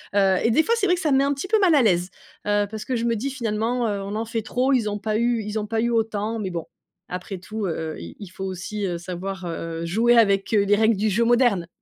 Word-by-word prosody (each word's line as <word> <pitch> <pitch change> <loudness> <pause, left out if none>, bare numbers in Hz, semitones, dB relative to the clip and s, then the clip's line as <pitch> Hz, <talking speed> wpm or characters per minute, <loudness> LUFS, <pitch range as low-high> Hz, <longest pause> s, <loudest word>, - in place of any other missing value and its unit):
Heu 195 -2 +4
et 230 - +2
des 315 +7 +4
fois, 465 - +1
c'est 405 - +1
vrai 360 -1 +3
que 350 - -5
ça 300 - +1
me 265 - +5
met 275 - +4
un 285 - +1
petit 280 +7 -5
peu 440 -1 +4
mal 355 -6 +4
à 275 - +5
l'aise, 180 -4 +2 0.4
heu, 205 0 +2
parce 215 0 -6
que 255 - -1
je 230 - -1
me 230 -1 +1
dis: 275 +6 -2
«Finalement, 235 0 -1
heu, 200 -1 -2
on 200 +2 -5
en 225 +1 -2
fait 225 0 -3
trop, 250 +4 0
ils 230 -5 +2
ont 205 0 -3
pas 215 0 -1
eu 235 -1 +1
ils 210 +1 -3
ont 210 - -4
pas 225 0 0
eu 235 - +1
autant», 225 -1 -1
mais 195 -3 -3
bon 170 -2 -4 0.4
après 185 +2 -5
tout, 210 +2 -5
heu - - -1 0.3
heu, - - -10
il 85 0 -9
il 200 - -8
faut 190 +1 -6
aussi, 190 +2 -4
heu, 175 -2 -2
savoir 185 +2 -6 0.4
jouer, 230 +7 +3
heu, - - +4
avec, 200 -1 +3
heu, 205 -1 +4
les 205 +1 +3
règles 220 0 +4
du 215 +1 +1
jeu 230 +4 +2
moderne. 235 -8 +3
220 Hz, 295 wpm, -23 LUFS, 195-240 Hz, 0.4 s, me